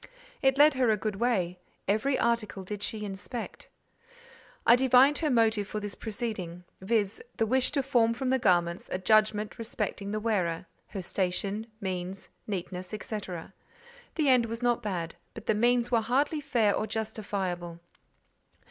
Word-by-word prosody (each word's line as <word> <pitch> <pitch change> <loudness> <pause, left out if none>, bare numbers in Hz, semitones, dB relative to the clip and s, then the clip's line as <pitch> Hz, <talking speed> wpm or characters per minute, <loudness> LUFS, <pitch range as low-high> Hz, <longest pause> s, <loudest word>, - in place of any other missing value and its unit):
It 270 -1 +3
led 295 +1 +7
her 255 -3 +2
a 215 - +3
good 210 -1 -3
way: 185 -7 0 0.3
every 220 +7 +2
article 230 -4 0
did 205 +2 -6
she 215 0 -2
inspect. 195 +4 -5 1.0
I 235 - +8
divined 260 +3 +5
her 310 - +1
motive 220 -5 +3
for 215 - -3
this 205 -1 -4
proceeding, 205 -6 -5 0.2
viz. 205 0 0 0.2
the 225 - +2
wish 255 +3 +2
to 280 -2 +1
form 235 -4 +3
from 255 +2 -2
the 260 0 +3
garments 175 -4 +1
a - - 0
judgment 215 +3 +2
respecting 215 -4 -3
the 215 +1 -1
wearer, 185 -6 0 0.2
her 195 -3 -6
station, 195 +4 -1
means, 185 -1 -4 0.2
neatness, 185 -2 -4
&c. 215 - -4 1.2
The 310 -3 +1
end 250 -3 +5
was 230 +2 -4
not 240 -1 +2
bad, 175 -5 -3 0.2
but - - -9
the - - +3
means 240 +2 +2
were 230 -2 +4
hardly 275 +7 +1
fair 235 -8 +2
or 215 - -1
justifiable. 195 -6 -3
215 Hz, 155 wpm, -29 LUFS, 195-240 Hz, 1.2 s, I